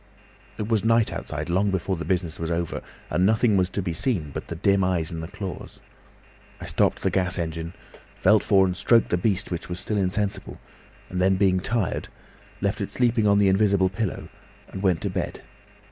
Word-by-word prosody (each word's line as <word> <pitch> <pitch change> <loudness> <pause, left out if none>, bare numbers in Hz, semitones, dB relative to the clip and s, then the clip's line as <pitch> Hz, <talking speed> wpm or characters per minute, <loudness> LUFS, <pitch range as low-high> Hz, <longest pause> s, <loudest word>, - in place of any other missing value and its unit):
"It 105 - -3
was 110 -3 +1
night 115 0 +3
outside - - -4
long 95 +4 +1
before 95 0 -1
the 85 - -5
business 90 -4 -1
was 80 -1 -3
over, 85 0 -2 0.3
and 90 - +2
nothing 110 +2 +3
was 90 -1 +2
to 100 - -3
be 85 -3 -2
seen 80 - -1
but - - -6
the 85 - -5
dim 100 +2 +2
eyes 90 -2 0
and 80 -1 -5
the 80 - -5
claws. 100 -1 -7 0.8
I - - -7
stopped - - +1
the - - +1
gas 90 -1 +1
engine, 80 0 -4 0.4
felt 105 +3 +4
for 95 -2 +4
and 90 -1 -1
stroked 115 +5 +3
the 90 - +2
beast, 100 0 0
which 85 0 -4
was 90 0 -4
still 105 - -2
insensible, 100 +1 -1 0.5
and 90 0 -1
then, 95 +1 +4
being 95 -1 +3
tired, 105 0 -1 0.5
left - - -1
it - - -2
sleeping 120 -3 +2
on 100 0 +5
the 100 -1 +4
invisible 95 -1 +3
pillow 95 0 -4 0.4
and 95 - -7
went 90 -5 +2
to - - -1
bed. - - -4
95 Hz, 200 wpm, -25 LUFS, 90-105 Hz, 0.8 s, on